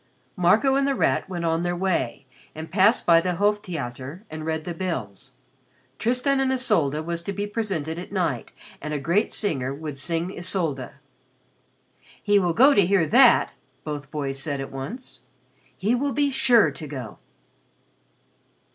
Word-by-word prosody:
Marco 210 +10 +3
and 275 0 +2
The 275 - +1
Rat - - 0
went 175 -2 -3
on 165 0 +1
their 175 0 -1
way 175 -8 -1 0.3
and 160 +1 -8
passed 205 +5 +3
by 165 -1 +6
the 180 0 -1
Hof 205 +3 +2
Theater 140 - -6
and 155 0 -6
read 160 -1 -2
the 175 - -5
bills. 135 - -5 0.7
"Tristan 255 +4 +1
and 265 -1 +1
Isolde" 175 - +1
was 170 0 -3
to 185 - -4
be 200 +1 -3
presented 190 -7 -3
at 180 - -9
night 170 - -2 0.3
and 150 +1 -4
a - - -2
great 170 +9 +1
singer 135 - -1
would 150 -2 -7
sing 170 +5 -1
Isolde. 165 -8 0 1.3
"He 205 -1 +3
will 175 -3 +1
go 270 - +6
to 200 - +5
hear 185 -1 +2
that," 245 - +5 0.3
both 145 -3 -6
boys 140 -3 -4
said 140 0 -3
at 135 - -6
once. 200 - -7 0.6
"He 210 +5 0
will 275 +2 0
be 285 +2 +1
sure 235 - +4
to 150 +2 -7
go." 130 -7 -8
170 Hz, 165 wpm, -24 LUFS, 150-210 Hz, 1.3 s, by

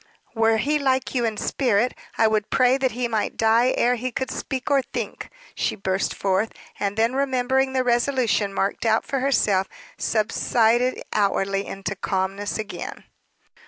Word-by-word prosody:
"Were 225 -1 +3
he 295 +7 +1
like 265 -2 0
you 245 -3 +1
in 220 -2 -2
spirit, 245 -2 +1 0.2
I 225 - +4
would 215 -1 0
pray 255 0 +4
that 265 -3 0
he 245 +1 -1
might 220 -2 -2
die 225 +3 +4
ere 245 - +3
he 255 +2 -3
could 260 +2 -3
speak, 265 +1 -4
or 275 -1 +4
think!" - - -6 0.2
she - - -1
burst 190 -1 -1
forth. 195 +3 0 0.3
And 200 +1 -2
then 230 +2 +2
remembering 265 -1 +1
the 260 -1 +1
resolution 240 -4 +1
marked 195 0 -1
out 225 -1 +2
for 275 - -2
herself, 210 -8 +2 0.3
subsided 230 +3 +1
outwardly 195 -1 0
into 195 0 -4
calmness 195 +1 -2
again. 215 -1 -6
230 Hz, 160 wpm, -23 LUFS, 205-255 Hz, 0.3 s, I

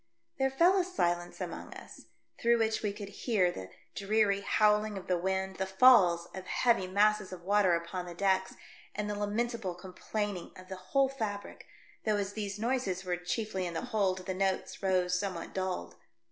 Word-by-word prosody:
There 270 0 +3
fell 340 +8 +4
a - - +3
silence 175 - -1
among - - -6
us, - - -12 0.3
through 235 0 +4
which 220 -1 +1
we 210 - -1
could 205 0 -8
hear 200 -4 +1
the 95 - -8 0.2
dreary 200 0 +1
howling 210 0 +2
of 190 - -7
the 180 - +1
wind, 190 +1 -1
the 190 - -1
falls 190 -5 +6
of 190 -1 -8
heavy 235 -6 +2
masses 210 +1 +2
of 180 -2 -8
water 195 -2 +3
upon 175 +2 -4
the 175 - -8
decks, 190 0 +1 0.4
and 210 0 -2
the 210 - -2
lamentable 210 -1 -2
com 180 +1 -11
plaining 205 -3 -4
of 185 0 -13
the 190 - -5
whole 270 +9 +1
fabric, 220 -7 -5 0.4
though 215 -1 +1
as 200 0 -2
these 205 -2 -4
noises 220 -5 -1
were 180 -1 0
chiefly 185 +1 -3
in 170 - -6
the - - -1
hold 195 -6 0
the 190 - -2
notes 190 0 -1
rose 180 -2 +1
somewhat 185 -4 -4
dulled. 185 -1 -3
195 Hz, 185 wpm, -31 LUFS, 185-215 Hz, 0.4 s, falls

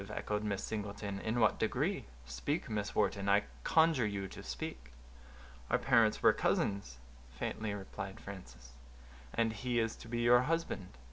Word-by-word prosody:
echoed 105 0 -2
Miss 100 -2 -1
Singleton; 100 -2 -4
"in 110 +4 -1
what 110 -2 +4
degree?—speak, 60 0 -2
Miss 105 -1 -2
Wharton, 100 -1 +1
I 100 +1 +5 0.2
conjure 160 -8 +4
you 100 -2 -3
to - - -9
speak." 60 -1 -6 0.8
"Our - - +4
parents 115 -2 +3
were - - +7
cousins," 100 -12 0 0.3
faintly 105 - -3
replied 95 0 -6
Frances. 65 -11 -10 0.6
"And 115 -1 +1
he 120 +3 -1
is 115 -1 0
to - - -11
be 120 0 -1
your 120 +1 +6
husband?" 125 - -2
105 Hz, 145 wpm, -34 LUFS, 95-115 Hz, 0.8 s, were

